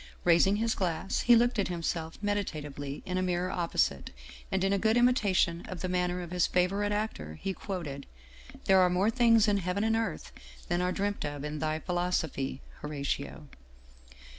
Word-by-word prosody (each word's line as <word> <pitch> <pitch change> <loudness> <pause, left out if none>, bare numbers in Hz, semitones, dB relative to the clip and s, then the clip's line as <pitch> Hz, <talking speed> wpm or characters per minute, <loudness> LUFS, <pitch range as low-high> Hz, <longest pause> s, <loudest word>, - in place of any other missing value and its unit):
Raising 175 +3 +5
his 225 +1 +1
glass, 175 -1 -1
he 240 - +6
looked 240 0 +3
at 200 - +1
himself 165 -2 -3
meditatively 150 -9 -3
in 185 0 -1
a - - 0
mirror 180 0 -1
opposite, 170 -2 0 0.4
and, 190 -1 0
in 195 +1 +2
a 200 - +1
good 220 +3 +3
imitation 205 -8 +2
of 185 -3 -6
the 185 - -1
manner 180 0 0
of 175 - -9
his 180 -1 +2
favorite 195 +3 +1
actor, 205 - -3
he 195 - -2
quoted: 165 -9 -6 0.3
" 65 0 -18
There 190 -1 +5
are 180 - +5
more 190 +5 +2
things 230 -2 +4
in 205 -1 +3
heaven 185 +2 -1
and 225 0 +2
earth 225 0 -3 0.4
than 175 0 +1
are 180 0 +1
dreamt 205 +2 -2
of 145 -1 -4
in 150 0 -4
thy 155 0 -1
philosophy, 165 -7 -2 0.2
Horatio." 145 0 -4
180 Hz, 180 wpm, -30 LUFS, 160-205 Hz, 0.4 s, he